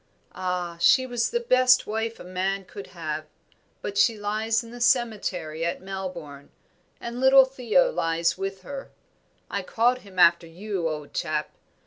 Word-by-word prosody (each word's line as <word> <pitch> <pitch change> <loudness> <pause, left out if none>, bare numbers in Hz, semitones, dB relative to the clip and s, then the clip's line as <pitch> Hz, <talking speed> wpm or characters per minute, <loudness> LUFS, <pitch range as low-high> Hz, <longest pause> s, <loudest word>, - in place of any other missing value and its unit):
Ah, 180 -2 -3
she 260 +7 +5
was 245 -2 -1
the 475 - 0
best 255 - +4
wife 225 +1 -3
a - - -9
man 190 +2 -2
could 200 +1 -10
have, 155 -3 -5 0.6
but 200 - -2
she 230 -2 +4
lies 215 +3 -1
in 230 - -12
the 240 0 -9
cemetery 205 -10 0
at 170 - -1
Melbourne, 180 -7 -7 0.5
and 235 +1 -6
little 265 0 +7
Theo 270 - +2
lies 165 - 0
with 195 0 -5
her 275 +3 -7 0.6
I - - -3
called 245 +2 +1
him 200 -5 -16
after 170 -1 +5
you, 180 0 -3
old 150 -2 -6
chap. - - -2
200 Hz, 155 wpm, -25 LUFS, 175-240 Hz, 0.6 s, little